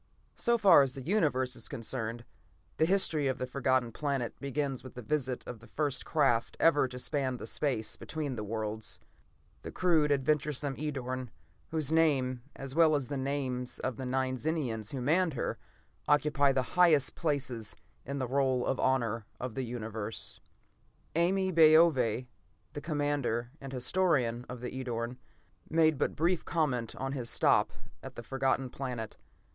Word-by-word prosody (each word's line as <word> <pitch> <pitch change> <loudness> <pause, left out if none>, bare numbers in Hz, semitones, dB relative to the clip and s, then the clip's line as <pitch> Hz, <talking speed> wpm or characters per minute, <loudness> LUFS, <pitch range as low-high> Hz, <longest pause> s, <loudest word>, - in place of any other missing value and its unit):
So 235 0 +2
far 200 -9 +7
as 135 -2 0
the 135 - -6
Universe 140 -8 +1
is 115 - -7
concerned, 115 0 -4 0.5
the 160 - +3
history 165 -6 +3
of 130 -1 0
the 130 - -2
Forgotten 130 -2 +1
Planet 135 -2 -2
begins 140 -1 -2
with 130 - -11
the 125 - -7
visit 130 0 -2
of 120 -2 -7
the 115 - -15
first 145 +1 -1
craft 135 -7 +2
ever 145 -5 +4
to 125 0 -8
span 130 -1 -1
the - - -7
space 125 -7 -1
between 150 -5 -4
the 105 - -4
worlds: 110 0 -3 0.6
the - - -7
crude, 160 -5 +2
adventuresome 145 0 +1
Edorn, 130 -4 -3 0.4
whose 155 -2 0
name, 135 -6 +2
as 135 -1 -6
well 160 0 +5
as 140 -3 -2
the 145 - -2
names 130 -2 -2
of 130 -4 -3
the 130 - -4
nine 130 0 0
Zenians 125 -9 -2
who 135 - -4
manned 160 +4 +2
her, - - -2 0.5
occupy 145 -1 +4
the 130 -1 +1
highest 165 -6 +5
places 130 -8 -2 0.3
in 140 +1 -4
the 130 -2 -1
roll 130 -1 +1
of 135 - -1
honor 115 -4 +1
of 125 -2 -4
the 135 - -2
Universe. 110 -2 -5 0.8
Ame 185 +3 +2
Baove, 155 -7 +5 0.5
the 145 - -5
commander 145 -6 -1
and 135 -1 -7
historian 125 -3 +1
of 125 -1 -7
the 125 - -4
Edorn, 125 -2 -3 0.5
made 160 -3 +3
but - - 0
brief 170 +2 +1
comment 130 -9 -1
on 135 0 -3
his 125 -4 -4
stop - - +3 0.3
at - - -9
the 120 - -7
Forgotten 135 0 0
Planet. 125 -5 -5
135 Hz, 160 wpm, -31 LUFS, 125-150 Hz, 0.8 s, far